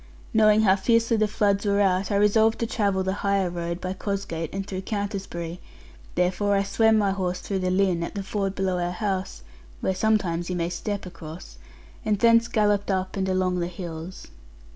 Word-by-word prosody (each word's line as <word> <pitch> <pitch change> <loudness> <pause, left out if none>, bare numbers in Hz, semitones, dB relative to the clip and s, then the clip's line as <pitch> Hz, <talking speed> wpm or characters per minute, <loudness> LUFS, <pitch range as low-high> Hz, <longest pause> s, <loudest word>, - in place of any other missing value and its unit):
Knowing 215 -1 +5
how 190 -2 +5
fiercely 230 +3 +2
the 215 -1 +2
floods 205 -1 +1
were 200 -1 +2
out, 190 -1 +2
I 205 - 0
resolved 220 +2 +4
to 230 - -1
travel 200 -4 0
the 190 0 -1
higher 200 -3 +1
road, 170 0 -4
by 185 0 -3
Cosgate 190 -5 -3
and 195 0 -4
through 190 -2 -5
Countisbury; 195 -5 -4 0.6
therefore 185 +3 +1
I 195 - +2
swam 220 +3 +3
my 200 -2 +2
horse 180 -2 -2
through 195 -2 -3
the 185 0 0
Lynn, 185 -2 +2
at 170 - -4
the 200 - -3
ford 195 0 -2
below 185 -2 0
our 175 0 -1
house 190 -1 -3 0.4
(where 190 - 0
sometimes 185 -4 0
you 180 - -2
may 170 -1 -1
step 200 +3 -4
across), 165 -2 -10 0.4
and 215 -3 +1
thence 230 +2 +5
galloped 205 -3 +1
up 185 -1 -1
and 190 -1 -1
along 185 -1 +1
the 170 - -1
hills. 175 0 -8
195 Hz, 190 wpm, -25 LUFS, 180-205 Hz, 0.6 s, Knowing